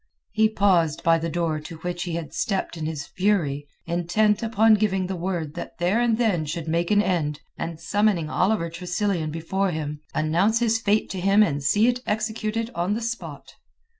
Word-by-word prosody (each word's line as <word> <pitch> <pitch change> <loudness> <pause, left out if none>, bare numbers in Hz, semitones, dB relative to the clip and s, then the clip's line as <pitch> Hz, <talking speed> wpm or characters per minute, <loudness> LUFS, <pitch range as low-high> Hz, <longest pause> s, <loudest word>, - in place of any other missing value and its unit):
He 220 0 +3
paused 180 -7 +2
by 165 0 +4
the 165 +1 -2
door 165 -2 -1
to 160 +2 -9
which 175 +2 -4
he 175 - -4
had 165 -4 -5
stepped 195 -4 -1
in 155 -2 -4
his 150 -2 -4
fury, 165 -8 0 0.2
intent 175 +5 +1
upon 225 -1 +4
giving 195 -3 +1
the 190 +1 -3
word 170 -4 -3
that 175 - -7
there 180 +7 +1
and 235 -2 +2
then 215 -9 +1
should 165 +2 -4
make 170 +2 0
an 205 0 +4
end, 150 -6 -1
and 165 -1 -5
summoning 200 -1 +1
Oliver 180 +1 0
Tressilian 175 -1 -1
before 180 +5 -1
him, 150 -3 -4
announce 170 +8 +2
his 230 -1 +2
fate 210 0 +2
to 190 - -4
him 195 +3 +5
and 145 -8 -1
see 205 +10 +3
it 245 0 +1
executed 220 +1 -2
on 175 +4 0
the - - -2
spot. 235 +1 -6
180 Hz, 190 wpm, -24 LUFS, 165-210 Hz, 0.2 s, him